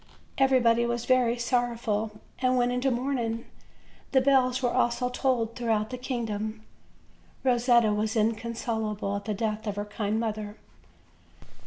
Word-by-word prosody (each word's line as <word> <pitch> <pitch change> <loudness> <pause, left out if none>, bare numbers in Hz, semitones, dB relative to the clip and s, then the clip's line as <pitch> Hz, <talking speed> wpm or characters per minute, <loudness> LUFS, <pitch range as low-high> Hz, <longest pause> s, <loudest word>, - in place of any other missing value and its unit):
Everybody 245 -3 +4
was 235 0 -2
very 250 -2 +3
sorrow 240 0 0
ful, 215 -2 -2 0.2
and 255 0 +2
went 245 0 +2
into 250 +2 +1
mourning; 240 -2 -1 0.7
the 265 - +6
bells 260 -1 +3
were 245 - +1
also 245 +1 +1
tolled 245 -3 0
throughout 225 -2 0
the - - -3
kingdom. 220 -4 -3 0.8
Rosetta 240 -3 +4
was 215 +1 -1
inconsolable 220 -2 -1
at 200 0 -5
the 215 -1 -2
death 220 0 -2
of 205 - -2
her 205 0 -3
kind 210 +1 -2
mother. 215 -2 -3
235 Hz, 140 wpm, -27 LUFS, 215-250 Hz, 0.8 s, the